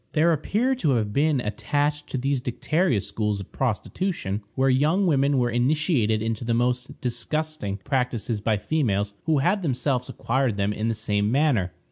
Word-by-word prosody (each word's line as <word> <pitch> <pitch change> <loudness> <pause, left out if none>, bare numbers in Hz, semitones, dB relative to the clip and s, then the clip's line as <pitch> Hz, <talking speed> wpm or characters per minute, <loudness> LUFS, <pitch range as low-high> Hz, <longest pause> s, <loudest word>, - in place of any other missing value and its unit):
There 165 +2 +4
appear 215 - +1
to 165 - 0
have 105 -3 -1
been 145 +1 +2
attached 145 +7 -1
to - - -3
these 135 +1 0
dicteria 130 - 0
schools 105 -1 -2
of 100 - -9
prostitution, 125 - -2
where 135 0 +2
young 150 +9 +3
women 140 -4 +3
were 120 -1 +1
initiated 120 - +1
into 115 0 -2
the 115 0 0
most 125 +2 -1
disgusting 125 -2 -2
practices 115 -1 -2
by 110 0 +1
females 105 -6 0
who 160 -2 +3
had 180 +9 +2
themselves 130 -4 -1
acquired 125 -3 0
them 100 +1 0
in 110 +2 -2
the 115 - 0
same 105 -1 0
manner. 130 -10 +2
125 Hz, 165 wpm, -25 LUFS, 110-150 Hz, -, There